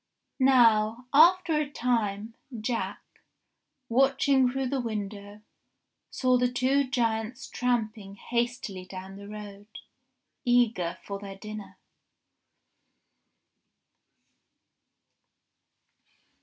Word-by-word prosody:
Now, 235 -3 +4
after 340 +3 +6
a 300 -2 -2
time, 225 -5 -1 0.3
Jack, 230 +2 -3 0.8
watching 265 +1 +3
through 265 0 -2
the 270 -1 -1
window, 205 -2 -6 0.7
saw 255 -1 +2
the 250 0 +1
two 260 +3 +2
giants 230 0 -1
tramping 220 -5 -2
hastily 235 -4 -3
down 190 +1 -9
the 200 0 -10
road, 205 -1 -9 0.8
eager 235 - +2
for 200 -1 -5
their 195 -1 -8
dinner. 215 0 -9
230 Hz, 80 wpm, -28 LUFS, 205-255 Hz, 0.8 s, after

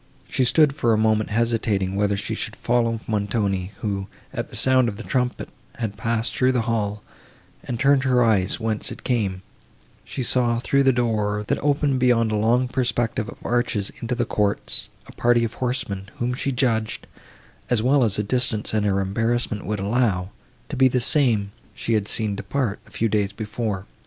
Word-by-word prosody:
She 130 - +1
stood 150 +3 +4
for 120 -5 +2
a - - +3
moment 110 0 +2
hesitating 110 -4 0
whether 100 0 +1
she - - -3
should - - -4
follow 115 -2 0
Montoni, 100 -3 -1
who, 100 -2 -2 0.3
at - - -4
the - - -10
sound 130 -2 +3
of 105 - -6
the - - -7
trumpet, 125 -1 -1 0.3
had 110 -4 -4
passed 115 +1 -1
through 130 0 +3
the 120 -3 +1
hall, 105 -3 -2 0.6
and, 120 -2 -4
turning 140 0 +4
her 125 -2 +3
eyes 100 -4 +2
whence 110 -2 -1
it - - -9
came, 100 -7 -1 0.6
she 130 - -4
saw 120 -1 +2
through 140 +3 +2
the 135 -1 +5
door, 105 -4 0
that - - 0
opened 145 -2 +1
beyond 120 -3 +3
a - - +1
long 120 +4 +2
perspective 120 -2 -1
of - - -10
arches 120 -4 0
into 120 +1 -2
the 120 0 0
courts, 105 -2 -1 0.2
a - - -12
party 120 0 +2
of 115 - -2
horsemen, 105 -6 -3
whom 120 +1 -1
she 135 +2 -2
judged, 115 -4 0 0.6
as 120 -3 +2
well 135 +1 +4
as 110 -3 +2
the 105 - 0
distance 115 -1 0
and 105 -1 +1
her 100 -1 +1
embarrassment 115 +2 -1
would 105 -1 -2
allow, 100 -3 0 0.4
to - - -4
be 130 0 +5
the 125 0 +1
same 115 -7 +1 0.2
she 115 - -2
had 105 -2 +1
seen 105 -3 +1
depart, 115 0 -2
a - - -16
few 115 - 0
days 105 -2 0
before. 105 -2 -3
115 Hz, 185 wpm, -23 LUFS, 105-125 Hz, 0.6 s, the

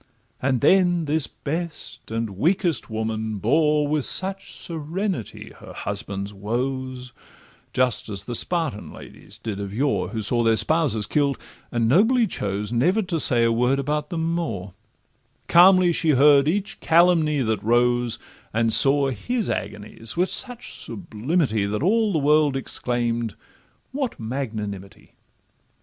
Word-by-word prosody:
And 130 -2 0
then 175 +1 +3
this 150 -1 0
best 165 +2 -6
and 115 -1 -3
weakest 170 - +1
woman 110 -1 -3
bore 150 +7 +2
With 150 -1 0
such 195 +5 -1
serenity 170 - -5
her - - -11
husband's 100 +1 -5
woes, 125 +4 -4 0.6
Just 125 -3 0
as 100 -1 -4
the 120 - -6
Spartan 155 - -1
ladies 105 - -12
did 110 -3 -5
of 100 -1 -5
yore, 135 +7 0
Who 110 -2 -4
saw 120 +3 +1
their 115 -1 +3
spouses 140 -6 +2
kill'd, 140 +4 0 0.3
and 120 -2 0
nobly 225 - +4
chose 105 - -3
Never 180 - +2
to 175 -3 -2
say 120 -4 +4
a 115 - +3
word 125 +4 +2
about 150 +2 -2
them 165 -1 -2
more— 100 - -4 0.7
Calmly 180 0 +6
she 160 - 0
heard 140 +1 +5
each 200 +5 -2
calumny 165 -3 +3
that 110 -3 -1
rose, 120 +1 +2 0.4
And 115 0 +2
saw 140 0 +6
his 225 - -2
agonies 110 +4 -6
with 180 +2 +2
such 245 -2 -1
sublimity, 125 - -2
That 105 +6 -2
all 215 +3 +2
the 165 - 0
world 150 -1 +3
exclaim'd, 120 -3 -2 0.6
'What 265 -2 -3
magnanimity! 110 -5 -6
135 Hz, 135 wpm, -23 LUFS, 115-165 Hz, 0.7 s, Calmly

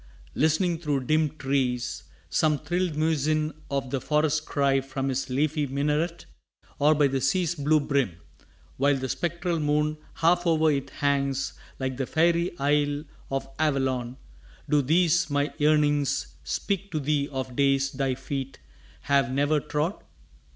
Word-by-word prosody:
Listening 160 +3 +1
through 145 -5 -1
dim 155 +2 +1
trees 125 -4 -1 0.2
Some 155 -2 +2
thrilled 175 +2 -1
muezzin 155 0 +1 0.2
of 135 -2 -2
the 135 - -1
forest 155 0 +1
cry 140 -1 +2
From 135 0 -3
his 130 +1 -2
leafy 145 +3 0
minaret? 150 +5 -1 0.5
Or 150 +2 +5
by 150 -1 +4
the 135 -1 0
sea's 175 +6 +1
Blue 155 -1 +2
brim, 140 - 0 0.6
while 140 +1 +3
the 130 -1 -3
spectral 170 +3 -2
moon 150 0 0 0.2
half 175 +2 +2
o'er 160 -1 +4
it 140 -2 -2
hangs 140 -1 0 0.2
Like 130 -1 -3
the 135 -2 -2
faery 170 +2 +2
isle 145 +1 +1 0.3
of 135 0 -2
Avalon, 130 -5 0 0.5
do 150 -1 +3
these 170 +4 +3
My 145 +1 0
yearnings 145 -2 +2
speak 200 0 -2
to 155 - 0
thee 145 0 0
of 130 -2 -4
days 135 0 +2
thy 135 -1 -1
feet 135 0 -5 0.4
Have 140 -3 +2
never 145 +3 +2
trod? 150 +5 -2
145 Hz, 145 wpm, -26 LUFS, 135-155 Hz, 0.6 s, Or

